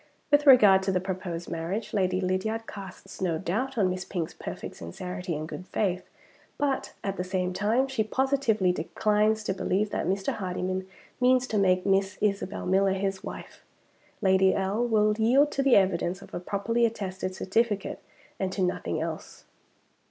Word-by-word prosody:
With 290 0 +4
regard 210 -8 +8
to 190 0 0
the 185 - +1
proposed 180 -2 -5
marriage, 180 +7 -4
Lady 185 -3 +1
Lydiard 190 +5 -1
casts 195 -2 -10
no 170 -4 +1
doubt 220 +10 -2
on 200 -4 +3
Miss 185 0 -3
Pink's 170 -5 -4
perfect - - -7
sincerity 180 - -5
and 155 +1 -4
good 180 +3 -8
faith; 185 -4 -1 0.5
but, 280 -2 -1
at 195 -1 -3
the 180 - -1
same 185 0 -2
time, 220 +7 +1
she 260 -5 0
positively 235 -5 +1
declines 210 +5 +1
to 195 - -1
believe 200 +2 0
that - - -2
Mr. 195 +1 0
Hardyman 185 -1 -3 0.3
means 255 0 +4
to 215 -4 -1
make 185 -2 +3
Miss 195 0 +1
Isabel 200 -1 -1
Miller 190 +1 +3
his 195 0 -2
wife. - - -9 0.6
Lady 190 0 +4
L. 195 +4 0
will 215 -3 +3
yield 270 +7 +4
to 275 - 0
the 270 -2 +5
evidence 185 -2 +1
of - - -16
a - - -3
properly 205 +6 -1
attested 190 -4 -5
certificate 205 +1 -1 0.4
and 190 -1 -1
to 190 - 0
nothing 180 -3 -1
else." 160 0 -6
195 Hz, 165 wpm, -27 LUFS, 185-220 Hz, 0.6 s, regard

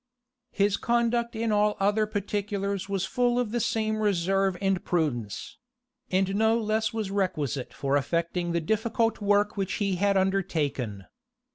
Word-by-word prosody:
His 200 0 +2
conduct 235 0 +1
in 225 0 -1
all 210 0 +2
other 205 +2 +2
particulars 200 -1 -2
was 195 -1 0
full 245 +1 +1
of 245 -4 0
the 240 - 0
same 220 -1 0
reserve 195 -1 +1
and 195 -2 0
prudence; 125 - -2 0.5
and 190 +1 +1
no 220 +2 +3
less 220 0 0
was 220 -3 -3
requisite 155 - -1
for 140 0 -1
effecting 170 +4 0
the 170 0 0
difficult 225 +5 0
work 205 0 +2
which 190 -2 -1
he 200 -3 0
had 200 +1 +2
undertaken. 155 - -1
200 Hz, 145 wpm, -27 LUFS, 180-220 Hz, 0.5 s, no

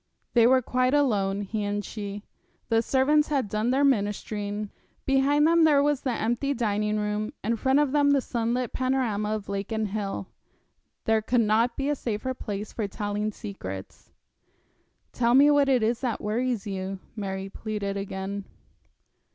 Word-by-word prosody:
They 235 -1 +6
were 260 0 +4
quite 255 +3 +1
alone, 205 -8 +1
he 210 +1 -3
and 205 0 -2
she. 205 -1 -6 0.5
The 225 0 +3
servants 285 +5 +3
had 275 -7 0
done 215 +3 -1
their 270 +3 +2
ministering. 205 -4 -1 0.3
Behind 275 +2 +3
them 335 +1 +5
there 290 -3 +5
was 290 -2 +1
the 265 - -2
empty 240 +5 -1
dining 210 -2 0
room, 210 +3 -2
in 230 +3 +1
front 265 +4 +2
of 295 -2 +2
them 290 0 +3
the 280 -1 +4
sunlit 240 0 -2
panorama 235 -5 0
of 210 -2 -6
lake 200 +1 -4
and 220 -2 -1
hill. 200 -1 -3 0.8
There 220 0 +3
could 240 +2 +2
not 225 +2 +2
be 275 - -1
a 295 - +1
safer 240 0 -3
place 210 -4 -6
for 215 -3 -2
telling 205 +1 -2
secrets. 95 - -8 1.0
'Tell 240 0 +2
me 285 +2 +7
what 285 -1 +4
it 255 -4 +3
is 230 +2 +1
that 245 -5 -1
worries 230 +1 -1
you,' 195 -1 -4 0.2
Mary 195 -2 -4
pleaded 200 -1 -4
again. 195 0 -4
220 Hz, 165 wpm, -26 LUFS, 205-260 Hz, 1.0 s, me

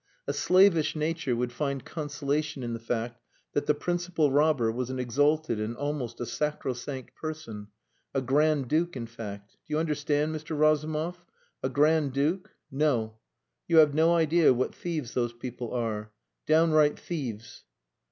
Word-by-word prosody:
"A - - 0
slavish 185 -4 +4
nature 155 -4 -1
would 120 +1 -1
find 140 -2 -2
consolation 150 -2 -2
in 120 -1 -3
the 115 - -4
fact 120 +1 -3 0.3
that 145 - -1
the 150 - +4
principal 175 -2 0
robber 140 -5 +3
was 125 +2 -3
an 130 - -3
exalted 145 +1 +1
and 110 +2 -3
almost 145 -4 -3
a 120 - -2
sacrosanct 135 -2 -3
person 135 -10 -6 0.4
a 135 - 0
Grand 140 +1 +2
Duke, 165 +4 +1
in 115 - -4
fact. 105 -3 -9
Do 150 - -2
you - - +2
understand, 150 -1 0
Mr. 155 0 -5
Razumov? 155 +3 +1 0.4
A 130 - -1
Grand 150 0 +3
Duke 155 +7 0 0.2
No! 120 -6 0 0.5
You 165 - +3
have 155 -2 +7
no 165 +3 +4
idea 165 -3 +4
what 130 - -1
thieves 155 -8 -4
those 120 -1 0
people 120 0 -6
are! 110 -3 -2 0.4
Downright 155 -1 +4
thieves!" 120 -10 -6
145 Hz, 150 wpm, -28 LUFS, 120-155 Hz, 0.5 s, have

